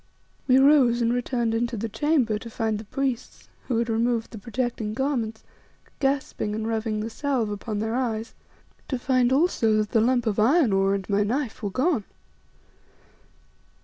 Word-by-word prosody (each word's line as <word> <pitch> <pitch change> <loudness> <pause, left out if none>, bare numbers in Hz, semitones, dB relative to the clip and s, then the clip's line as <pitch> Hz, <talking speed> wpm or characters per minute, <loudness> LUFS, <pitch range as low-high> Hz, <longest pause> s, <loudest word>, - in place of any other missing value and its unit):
We 255 -1 +5
rose 265 -4 +5
and 230 +1 +2
returned 240 -2 -1
into 235 +1 -1
the 225 +3 -2
chamber 250 -4 +1
to 230 - -9
find 220 -2 -2
the 220 - -9
priests, 260 +2 -4 0.2
who 245 - 0
had 235 0 0
removed 230 0 0
the 220 - -8
protecting 235 -2 -3
garments, 240 -5 -2 0.6
gasping 270 -6 -1
and 220 0 -3
rubbing 220 -1 -1
the 220 - -3
salve 260 -5 -1
upon 210 +1 -4
their 220 +2 -2
eyes; 230 -3 -2 0.5
to 260 - -2
find 250 0 +2
also 265 -6 +2
that 215 -1 -1
the 225 - +3
lump 245 +1 +2
of 215 -2 0
iron 255 - +4
ore 195 0 +2
and 195 -2 -5
my 205 0 +1
knife 240 +3 -2
were 205 - -2
gone. 255 - 0
230 Hz, 170 wpm, -25 LUFS, 220-260 Hz, 0.6 s, We